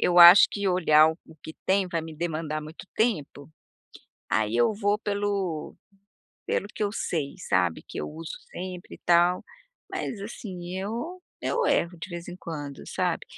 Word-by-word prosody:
eu 180 0 +3
acho 175 +3 +11
que 200 -1 -1
olhar 160 -4 +5
o 160 -1 -12
que 160 - -8
tem, 190 -1 +3
vai 165 -1 -1
me 160 -1 -8
demandar 155 -2 -2
muito 155 +4 -10
tempo, 155 - -1 0.8
aí 110 +1 +1
eu 120 - +3
vou 205 0 +1
pelo 200 -6 -2 0.7
pelo 200 - 0
que 210 - -3
eu 205 - -1
sei, 150 -9 -2
sabe, 90 -3 +1
que - - -10
eu - - -3
uso 160 +1 -7 0.2
sempre 180 0 -7
e - - -33
tal, 175 +1 +4 0.5
mas, 210 - -4
assim, 185 -4 -7
eu 240 - -4 0.2
eu 475 0 0
erro 175 +1 +1
de 165 - -7
vez 170 0 -7
em 175 - -7
quando 145 -6 -7
sabe. - - -1
175 Hz, 165 wpm, -27 LUFS, 155-200 Hz, 0.8 s, acho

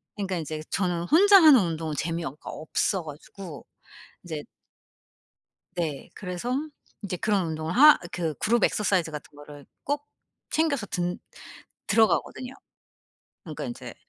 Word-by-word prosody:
그니까 195 -3 -2
인제 155 -1 -4
저는 180 -3 0
혼자 395 - +7
하는 300 -5 +9
운동은 160 -3 -2
재미어 165 -3 -3
가 - - -11
없어 175 +3 -1
가지고 155 - -10 0.6
인제 155 -4 -5 1.3
네. 160 -5 -3
그래서 180 +4 -5 0.5
인제 185 -3 -3
그런 195 -2 +1
운동을 160 0 -3
하 295 +7 +8
그 165 -3 -2
Group 235 +2 +3
exercise 185 -6 0
같은 150 -1 -9
거를 145 -1 -12 0.2
꼭 290 +1 -2 0.4
챙겨서 290 -9 0
든 175 -2 -2 0.7
들어가거든요. 245 +3 +1 0.9
그러니까 - - -6
인제 - - -7
180 Hz, 305 characters per minute, -26 LUFS, 160-220 Hz, 1.3 s, 하는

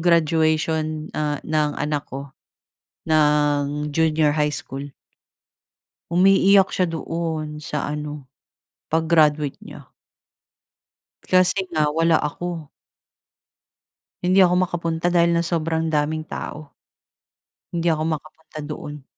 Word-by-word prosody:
graduation, 155 -2 +1
ah, 150 -2 -1
ng 150 -2 0
anak 150 -1 -2
ko 140 +1 -7 0.8
ng 150 -1 +2
junior 155 -2 +2
high 150 -1 +1
school. 135 +1 -5 1.3
Umiiyak 195 +2 +5
siya 185 - +2
doon. 160 -2 -4
Sa 150 -2 -3
ano, 150 -2 -5 0.6
pag-graduate 155 -3 +2
niya. - - -12 1.4
Kasi 185 +1 +4
nga 155 -2 +2
wala 165 +1 +3
ako. 165 +1 -4 1.6
Hindi 185 +2 +3
ako 180 -1 +5
makapunta 170 -1 -1
dahil 170 -1 +3
nga 170 - +1
sobrang 165 -1 -1
daming 155 +1 0
tao. 150 -2 -7 1.0
Hindi 170 0 +1
ako 155 -1 0
makapunta 155 0 -6
doon. 150 -1 -7
155 Hz, 100 wpm, -22 LUFS, 150-165 Hz, 1.6 s, Umiiyak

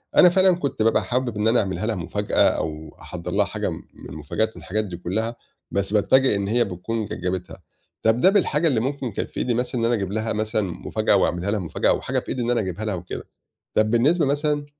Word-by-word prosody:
أنا 180 - +8
فعلًا 185 0 +4
كنت 140 -9 -3
بابقى 115 - +3
حابب 125 -3 -1
إن 105 +1 +1
أنا 120 +2 +4
أعملها 95 +1 -2
لها 110 -1 0
مفاجأة 95 +4 -3
أو 75 -1 -4
أحضّر 90 0 -6
لها 100 +1 +2
حاجة - - -3
م - - -6
من - - -12
المفاجآت 80 +9 -2
ومن - - -17
الحاجات 110 +3 -1
دي 90 -3 -6
كلّها 110 +7 -2 0.4
بس 100 +1 -1
بأتفاجئ 130 +3 +4
إن 100 0 -1
هي 120 +3 +3
بتكون 105 +4 -3
ج - - -6
جابتها، 90 0 -4 0.4
طَب 110 +2 +3
ده 190 - +7
بالحاجة 170 -5 +2
اللي 125 -7 +2
ممكن 130 0 -2
كانت - - -4
في - - -13
إيدي 120 - 0
مثلًا 125 0 -1
إن - - +2
أنا 120 - +2
أجيب 100 -4 -1
لها 110 +1 -1
مثلًا 110 0 0
مفاجأة 95 -4 0
وأعملها 90 +4 +1
لها 110 - 0
مفاجأة 85 - 0
أوحاجة - - 0
في - - -11
إيدي 125 - -2
إن 120 +1 0
أنا 120 - +2
أجيبها 100 +2 -4
لها 105 -3 -1
وكده، 90 +1 -7 0.5
طَب 110 0 +2
بالنسبة 150 +8 +3
مثلًا 145 +1 0
110 Hz, 230 wpm, -23 LUFS, 95-125 Hz, 0.5 s, أنا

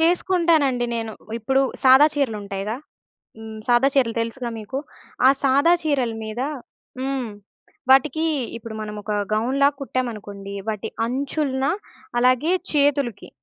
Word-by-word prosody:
చేసుకుంటానండి 330 -7 +2
నేను. 225 -1 -4 0.3
ఇప్పుడు 265 +4 +1 0.2
సాదా 265 +3 +8
చీరలుంటాయిగా, 210 -5 -2 0.6
హ్మ్. 220 0 -8
సాదా 245 +3 +5
చీరలు 250 -5 +2
తెలుసుగా 235 +1 -3
మీకు? 220 +5 -5 0.5
ఆ - - +9
సాదా 280 +6 +5
చీరల 270 -7 0
మీద 220 +3 -5 0.6
హ్మ్. 265 -3 -2 0.6
వాటికి 290 +4 +4 0.3
ఇప్పుడు 225 -1 -8
మనం 210 -1 -5
ఒక 210 +1 -3 0.2
గౌన్ 240 +5 0
లాగా 285 0 +4
కుట్టామనుకోండి. 210 -7 -4
వాటి 215 -2 -2 0.2
అంచులన 270 +1 -1 0.5
అలాగే 255 +7 +3 0.2
చేతులుకి. 280 -7 +1
255 Hz, 115 wpm, -22 LUFS, 220-280 Hz, 0.6 s, ఆ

